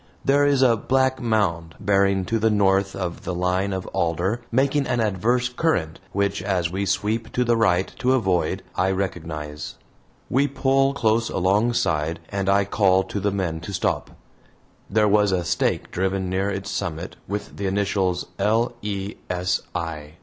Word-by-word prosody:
There 145 +1 +4
is 140 -2 +3
a 120 -3 +5
black 130 +3 +1
mound, 100 -8 0
bearing 100 -1 +2
to 115 +3 0
the 110 +1 +3
north 100 -2 +2
of 90 -2 -4
the 90 -1 -3
line 90 +2 0
of 95 -1 -3
alder, 85 +7 0
making 135 +3 +2
an 120 - 0
adverse 115 +4 +1
current, 125 - -1
which, 100 -1 0
as 90 -3 0
we 100 +2 -2
sweep 110 +4 -1
to 125 - +2
the 120 -1 +2
right 95 -5 +2
to 130 +1 +2
avoid, 95 -9 +1
I 95 - +2
recognize. 80 -6 -4 0.5
We 140 +3 +2
pull 135 0 +2
close 115 -3 +1
alongside 95 -5 +1
and 100 -1 -1
I 100 0 +4
call 95 -2 +3
to 100 - -4
the 100 +1 +1
men 90 -5 -2
to 90 +5 -7
stop. - - -1 0.8
There 105 +1 +3
was 105 -1 +3
a 90 -2 0
stake - - 0
driven 95 0 -1
near 95 +2 0
its 95 -1 -4
summit 85 -2 -4
with 100 0 -5
the 100 - -2
initials, 95 -2 0
"L. 115 +3 +2
E. 100 -1 -4
S. 90 0 0
I." 75 -3 -4
100 Hz, 165 wpm, -23 LUFS, 90-115 Hz, 0.8 s, a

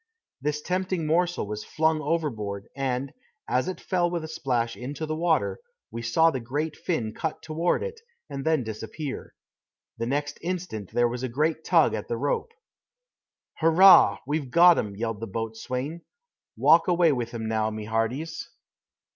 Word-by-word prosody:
This 150 +1 -2
tempting 185 -2 -1
morsel 175 0 +1
was 105 +1 -5
flung 160 0 +1
overboard, 115 -11 -2
and, 135 0 -2 0.3
as 125 +6 +1
it 185 - -4
fell 175 -2 0
with 170 -2 -3
a - - -5
splash 125 -7 -1
into 140 +5 -5
the 155 0 -3
water, 165 0 +1 0.3
we 115 - -5
saw 160 +8 +3
the 145 +4 -2
fin 115 -11 -1
cut 155 +4 -4
toward 165 +2 0
it, 470 -1 -6 0.3
and 140 -2 -5
then 160 -3 +2
disappear. 110 +6 -6 0.6
The 115 - -1
next 145 +3 -2
instant 170 - -4
there 120 0 +3
was 120 +1 -4
a 130 - -2
great 155 +5 0
tug - - +4
at - - -4
the 470 - -2
rope. 475 -1 -1 1.1
"Hurrah! 170 +4 +7
we've 145 -1 -2
got 175 +4 +7
'um!" 100 -2 -3
yelled 115 0 -3
the 115 - -5
boatswain. 115 - -4 0.6
"Walk 150 +8 +5
away 175 -2 +4
with 120 -4 -2
'im 110 -1 -3
now, 110 -1 0
my 110 0 -5
hearties." 115 +9 -2
145 Hz, 160 wpm, -26 LUFS, 115-165 Hz, 1.1 s, Hurrah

